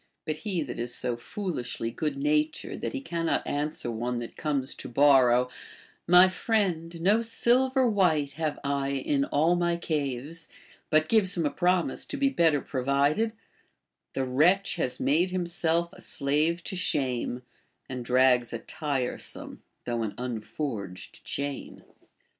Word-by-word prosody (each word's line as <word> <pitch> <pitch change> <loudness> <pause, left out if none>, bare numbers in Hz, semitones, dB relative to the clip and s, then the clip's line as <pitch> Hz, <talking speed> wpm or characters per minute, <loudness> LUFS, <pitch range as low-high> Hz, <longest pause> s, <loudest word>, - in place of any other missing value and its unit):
f - - -58
But 155 -1 -2
he 175 0 -2
that 125 -4 -7
is 120 0 -1
so 120 - 0
foolishly 125 - -4
good 145 +3 -2
natured 150 +2 0
that - - -3
he 275 - -3
cannot 170 -10 -1
an 145 +1 -1
swer 120 -6 -4
one 120 +2 -2
that 120 -1 -6
comes 140 -4 -1
to - - -8
borrow, 125 -2 +5 0.3
— - - -27
My 185 +1 +9
friend, 180 -4 -1
no 200 +7 +3
silver 255 +3 +2
white 170 -10 +2
liave 155 0 -2
I 140 -1 -1
in 140 +1 0
all 160 +6 +2
my 175 -1 +1
caves, 150 -1 -3 0.2
— - - -27
but 155 0 +3
gives 200 -3 +2
him 165 - +1
a 145 - +1
promise 180 -5 +1
to 290 - -5
be 275 0 +3
better 165 - +3
provided, 140 - +1 0.4
— - - -55
The 135 - 0
wretch 170 +10 +3
has 125 - -1
made 155 +8 +2
himself 170 -2 0
a - - -13
slave 155 +5 0
to 195 - -4
sliame, 130 -7 -1 0.4
And 125 -2 -5
drags 125 -1 +3
a - - -1
tiresome, 140 0 -4 0.2
though 120 -1 -1
an 110 -2 -3
unforged 115 -5 -5
chain.! 140 -1 -5
150 Hz, 160 wpm, -28 LUFS, 130-175 Hz, 0.4 s, My